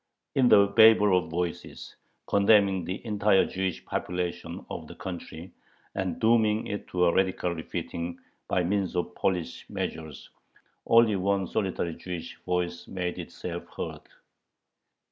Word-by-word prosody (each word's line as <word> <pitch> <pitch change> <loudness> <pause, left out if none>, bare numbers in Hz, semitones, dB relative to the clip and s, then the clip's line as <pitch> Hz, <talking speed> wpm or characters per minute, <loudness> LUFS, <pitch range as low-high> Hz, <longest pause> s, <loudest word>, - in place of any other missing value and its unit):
In 130 -2 +4
the 100 - +7
babel 105 -1 +6
of 90 -2 0
voices 85 +1 -4 0.3
condemning 100 -2 +4
the 95 +7 -5
entire 105 -2 +3
Jewish 95 -2 -3
population 90 -1 -4
of - - -6
the - - -11
country 90 -1 -7 0.4
and 95 -3 -3
dooming 110 -1 +3
it 105 -1 -5
to 90 -1 +1
a 85 - +3
radical 95 -2 +1
"refitting" 85 +1 -5 0.3
by 90 - +1
means 95 0 -1
of 90 0 -2
police 90 -3 -2
measures, 80 -3 -5 0.6
only 115 -3 +5
one 95 +1 +1
solitary 95 -4 -2
Jewish 85 -2 -7
voice 90 -1 -2
made 90 -2 -3
itself - - -6
heard. - - -5
95 Hz, 130 wpm, -27 LUFS, 85-100 Hz, 0.6 s, the